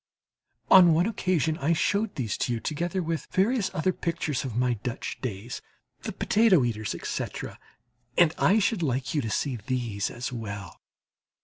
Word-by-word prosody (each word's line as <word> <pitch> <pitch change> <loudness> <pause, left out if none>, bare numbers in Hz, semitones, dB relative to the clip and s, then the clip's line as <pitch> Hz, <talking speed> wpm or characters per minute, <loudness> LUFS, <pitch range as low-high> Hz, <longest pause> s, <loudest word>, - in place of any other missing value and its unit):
On 175 -4 +8
one 170 +3 +3
occasion 180 - 0
I 150 +5 +2
showed 200 +6 0
these 115 -6 -2
to 120 - 0
you, 115 - -2
together 175 +7 -2
with 165 -1 -3
various 210 +2 +1
other 185 +1 0
pictures 160 -5 -2
of 125 -5 -5
my 125 0 +2
Dutch 125 -1 -4
days, 115 0 -5 0.4
the - - -4
"Potato 210 - +3
Eaters," 110 -3 -2
etc., - - -5 0.6
and 170 -2 +5
I 200 - +4
should 215 -2 +1
like 130 -4 -1
you 150 - +1
to 115 - -3
see 130 +3 -1
these 110 -3 -2
as 125 +2 -5
well. 100 -5 -7
145 Hz, 165 wpm, -27 LUFS, 120-180 Hz, 0.6 s, On